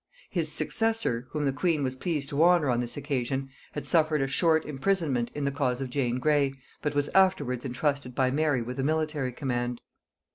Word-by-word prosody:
His - - +1
successor, 225 - 0
whom 150 -1 -2
the 135 -2 +1
queen 150 +1 +1
was 130 -1 -1
pleased 145 0 -3
to 145 0 0
honor 170 -5 +5
on 120 - +1
this 120 +2 -3
occasion, 135 -1 -2 0.2
had 150 - -5
suffered 155 -4 +3
a - - 0
short 160 +3 +2
imprisonment 145 -5 0
in 145 -1 -2
the 140 - +1
cause 130 -3 -1
of 130 -2 -4
Jane 125 -3 0
Grey, 140 0 +2 0.3
but 150 0 -2
was 145 0 +1
afterwards 145 -10 +2
intrusted 130 0 -2
by 130 -1 +2
Mary 145 -3 +1
with 125 +3 -6
a - - 0
military 155 -3 0
command. 120 -2 -2
140 Hz, 190 wpm, -28 LUFS, 125-155 Hz, 0.3 s, honor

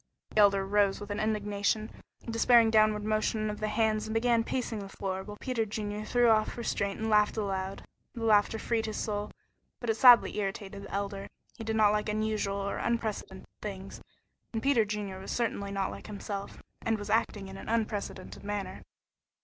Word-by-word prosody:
The - - 0
Elder 200 -2 +5
rose 200 0 +2
with 205 0 -7
an 205 - -2
indignant, 210 0 0 0.4
despairing 230 0 +5
downward 215 -1 +4
motion 215 0 0
of 210 - -7
the 215 - -1
hands 215 0 +1
and 220 - -4
began 230 0 +3
pacing 235 -3 -2
the 195 -1 -7
floor, 190 -1 -4
while 210 +1 -9
Peter 250 -4 -1
Junior 210 0 -4
threw 245 +2 +3
off 215 +1 +2
restraint 200 -4 -2
and 220 - -2
laughed 210 0 +3
aloud. 195 -2 -3 0.3
The 230 - -5
laughter 215 0 +4
freed 225 0 -1
his 215 - -4
soul, 210 -1 -2 0.5
but 240 -2 0
it - - +2
sadly 245 0 +7
irritated 200 0 -4
the - - -10
Elder. 200 0 -3 0.3
He 225 - -7
did 220 0 -2
not 215 -2 +5
like 210 0 0
unusual 215 -2 -1
or 200 0 -2
unprecedented 220 -5 -3
things, 195 -2 -7 0.5
and 225 -1 -3
Peter 270 -6 +4
Junior 205 -2 -4
was 190 - -9
certainly 200 -4 -1
not 195 -1 -1
like - - -9
himself, 200 -1 -6 0.2
and 225 -1 0
was 205 - -5
acting 210 -3 0
in 190 - -9
an - - -8
unprecedented 210 -4 -3
manner. 200 -2 -4
210 Hz, 185 wpm, -30 LUFS, 200-220 Hz, 0.5 s, sadly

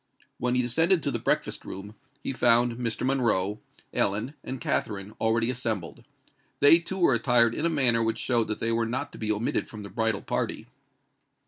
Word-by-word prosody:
When 125 0 0
he 125 - +2
descended 165 +8 +2
to 140 - 0
the - - -2
breakfast - - -1
room, 100 +2 -8 0.3
he - - -2
found 120 -1 +3
Mr. 120 0 -2
Monroe, 110 -7 +1 0.3
Ellen, 110 +8 0
and 130 - -5
Katherine 100 -3 -2
already 115 +2 +2
assembled: 110 -9 -3 0.6
they 155 +4 +7
too 170 +3 -6
were 170 -7 +4
attired 120 -1 +3
in 160 - 0
a - - +1
manner 130 -7 +3
which 115 0 0
showed 120 -3 0
that 110 - -2
they 115 - -1
were 115 0 +1
not 130 +5 -3
to - - -12
be 110 -1 0
omitted 110 +3 -1
from 105 -2 -8
the 100 - -8
bridal 110 -3 -1
party. - - -2
115 Hz, 190 wpm, -27 LUFS, 110-130 Hz, 0.6 s, they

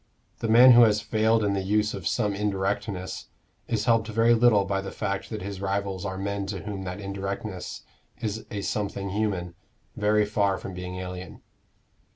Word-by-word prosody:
The 115 - -2
man 120 +4 +8
who 120 0 +8
has 110 -2 +5
failed 110 +1 +2
in 100 -1 +1
the 100 - 0
use 105 +2 +1
of 90 -4 -4
some 105 -1 0
indirectness, 100 -1 -2 0.4
is 110 -2 -1
helped 115 -2 +3
very 115 +1 +3
little 115 -4 +4
by 95 0 -1
the 95 - -6
fact 100 0 -3
that 110 -4 -5
his 100 -1 -6
rivals 100 -1 -2
are 95 0 -4
men 100 0 -3
to 95 -2 -4
whom 100 -2 -5
that 90 +2 -5
indirectness 100 -1 -5 0.4
is 110 0 -3
a 100 - -4
something 100 -1 -3
human, 95 -4 -1 0.4
very 105 0 +2
far 100 -2 +1
from 95 - -7
being 90 0 -6
alien. 90 0 -7
100 Hz, 180 wpm, -26 LUFS, 95-110 Hz, 0.4 s, man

